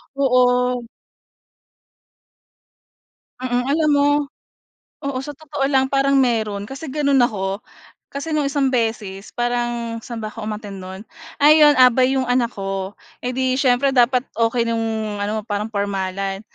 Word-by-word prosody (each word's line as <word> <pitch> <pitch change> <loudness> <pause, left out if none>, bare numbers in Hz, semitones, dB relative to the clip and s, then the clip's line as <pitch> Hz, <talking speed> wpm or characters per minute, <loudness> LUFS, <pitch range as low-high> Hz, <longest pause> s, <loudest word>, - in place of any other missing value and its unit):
Oo. 250 -2 +2 2.6
Mm, 245 -1 -1
alam 310 +1 +2
mo 285 0 +3 1.0
oo 280 -2 -2
sa 270 - -8
totoo 290 -2 -3
lang 265 -1 +2
parang 275 0 +2
meron 220 -6 +1
kasi 275 +7 -8
gano'n 280 -1 +2
ako. 195 -4 -1 0.5
Kasi 280 +3 -5
no'ng 295 -2 +1
isang 275 -2 0
beses 215 -5 -2
parang 240 -1 -2
saan 235 +1 -8
ba 215 - -5
ako 225 - -7
umattend 210 -3 -6
no'n? 190 +2 -9 0.4
Ayun, 300 -1 +7
abay 255 +1 +5
'yong 260 - +1
anak 245 -1 +2
ko, 195 0 -4 0.2
eh, 250 - -3
'di 260 0 +1
siyempre 270 +1 +3
dapat 250 0 +3
okey 230 +1 +1
no'ng 220 -2 -2
ano 210 +1 -2
parang 210 0 -3
pormalan. 195 -1 -2
245 Hz, 135 wpm, -20 LUFS, 215-270 Hz, 2.6 s, Ayun